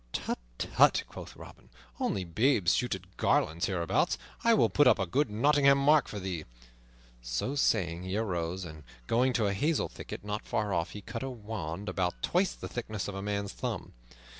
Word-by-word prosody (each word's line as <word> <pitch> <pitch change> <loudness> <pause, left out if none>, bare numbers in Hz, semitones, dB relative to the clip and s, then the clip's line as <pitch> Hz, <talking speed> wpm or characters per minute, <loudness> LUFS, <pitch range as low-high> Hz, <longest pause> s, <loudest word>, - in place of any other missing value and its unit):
"Tut, - - -2 0.2
tut," - - +4
quoth - - -10
Robin, - - -13 0.3
"only 95 - 0
babes 100 - +2
shoot 125 -5 0
at 95 0 -14
garlands 80 +2 +2
hereabouts. 85 -4 +1 0.3
I 230 -1 +5
will - - +4
put 145 - +4
up - - +6
a 95 - 0
good 130 - +1
Nottingham 140 +5 +4
mark 145 +1 +4
for 105 - -5
thee." 90 -5 -4 0.8
So - - -2
saying, 90 -11 +1
he 95 +2 -3
arose, 90 -4 -2
and 80 -2 -9 0.2
going 125 - +2
to 115 -3 +1
a 100 - +1
hazel 150 +10 +1
thicket - - -8
not 105 +1 -4
far 105 -2 -1
off, 85 -1 -1
he 105 - -7
cut 115 +3 -6
a 135 - -3
wand 105 -6 -5
about 90 -2 -2
twice 185 +1 +2
the - - -7
thickness 110 -4 -4
of 100 - -4
a 95 - -5
man's 100 0 -2
thumb. - - -4
105 Hz, 190 wpm, -30 LUFS, 90-125 Hz, 0.8 s, up